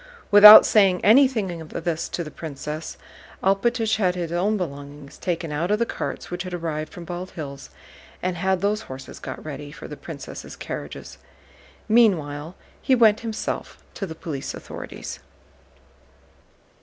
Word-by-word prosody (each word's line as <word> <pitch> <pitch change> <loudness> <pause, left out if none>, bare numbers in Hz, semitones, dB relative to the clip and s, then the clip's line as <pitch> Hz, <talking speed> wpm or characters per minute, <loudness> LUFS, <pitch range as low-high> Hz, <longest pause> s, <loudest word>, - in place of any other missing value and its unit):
Without 210 +1 +11
saying 195 -4 +3
anything 220 -8 +4
of 155 - -10
this 170 -1 -3
to 170 - -3
the 150 - -9
princess, 155 +1 -6 0.5
Alpátych 220 +3 +1
had 185 -4 +1
his 170 -2 -4
own 195 +5 +1
belongings 145 -4 -7
taken 165 -3 -3
out 160 +4 -2
of 210 - +2
the 235 - +1
carts - - -5
which 175 0 -3
had 180 -1 -5
arrived 155 -3 -4
from 175 - -9
Bald 180 +2 -6
Hills 140 -3 -7 0.5
and 180 0 -2
had 190 +1 0
those 210 +2 0
horses 130 0 -9
got - - -8
ready 145 -1 -7
for 165 +1 -10
the 150 - -8
princess' 145 -3 -9
carriages. - - -7 0.7
Meanwhile 165 -8 +2 0.3
he 265 - +3
went 220 -3 +5
himself 225 -2 -4 0.2
to 195 - -5
the 160 - -8
police 150 -4 -5
authorities. - - -8
175 Hz, 150 wpm, -23 LUFS, 155-205 Hz, 0.7 s, Without